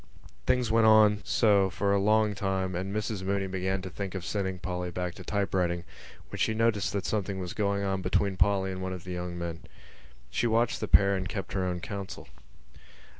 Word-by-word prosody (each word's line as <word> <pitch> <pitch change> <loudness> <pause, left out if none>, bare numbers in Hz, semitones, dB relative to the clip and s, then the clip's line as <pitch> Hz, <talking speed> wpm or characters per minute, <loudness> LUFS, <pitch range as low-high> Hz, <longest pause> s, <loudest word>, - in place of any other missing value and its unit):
Things 125 -3 +2
went 115 0 +5
on 105 -1 +6
so 100 -4 +3
for 100 +2 0
a 100 - +3
long 110 +1 +3
time 95 -2 -1
and 95 +2 -3
Mrs 105 -1 -2
Mooney 95 +1 -1
began 95 0 -2
to 95 - -5
think 100 0 -5
of 95 -2 -4
sending 95 -2 -2
Polly 90 0 -4
back 90 0 -3
to - - -10
typewriting 90 -4 0 0.5
when - - -6
she 110 - +1
noticed 110 -3 +1
that 100 -1 -2
something 100 -2 -1
was 90 -2 -4
going 100 -1 0
on 95 -1 -1
between 100 +1 +1
Polly 95 0 +2
and 95 0 -5
one 95 0 -3
of 90 -3 -7
the 90 - -7
young 90 0 -4
men. 85 -1 -4 0.7
She 120 - +1
watched 115 +1 +1
the - - -3
pair 100 0 +5
and 95 -1 -3
kept 95 - -5
her 95 -2 0
own 90 -1 -2
counsel. 100 0 -6
95 Hz, 205 wpm, -29 LUFS, 95-105 Hz, 0.7 s, on